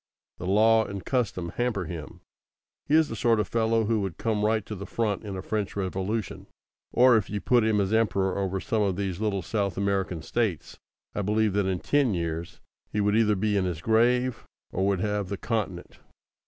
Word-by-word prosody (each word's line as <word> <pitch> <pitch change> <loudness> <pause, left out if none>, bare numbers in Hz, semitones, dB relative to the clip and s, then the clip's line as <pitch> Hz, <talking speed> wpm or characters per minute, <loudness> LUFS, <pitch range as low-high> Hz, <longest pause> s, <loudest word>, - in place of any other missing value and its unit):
The 90 - -5
law 110 +3 +5
and 100 -3 -7
custom 105 -9 -1
hamper 120 -6 0
him. 80 -3 -8 0.7
He 150 - +3
is 160 -1 +5
the - - -5
sort 115 0 +2
of 105 - 0
fellow 115 -1 +1
who 110 0 +1
would 95 -4 -4
come 110 -2 -1
right 110 -1 +1
to - - -6
the 100 -1 -7
front 110 -3 -1
in 100 -3 -5
a 95 - -6
French 105 -2 -2
Revolution. 95 +2 -3 0.4
Or 125 -1 +6
if 105 - -2
you 105 - -2
put 120 +2 +3
him 110 -1 +2
as 100 +1 0
Emperor 95 -4 +2
over 95 -1 -1
some 110 +3 -1
of 100 -3 +1
these 95 -1 -3
little 100 -4 0
South 100 -3 -2
American 95 -4 -1
States, 110 -9 -2 0.3
I - - -2
believe 105 +1 +1
that 100 -1 +1
in 95 -2 -1
ten 140 -8 +2
years 85 -1 -4 0.3
he 105 - -1
would 105 0 +2
either 110 -2 +3
be 105 +2 0
in 95 -2 +2
his 90 -4 -3
grave, 120 +5 +2 0.3
or 95 +2 0
would 100 -2 +1
have 105 -2 -1
the 100 - -3
Continent. 100 -5 -3
105 Hz, 205 wpm, -27 LUFS, 95-110 Hz, 0.7 s, Or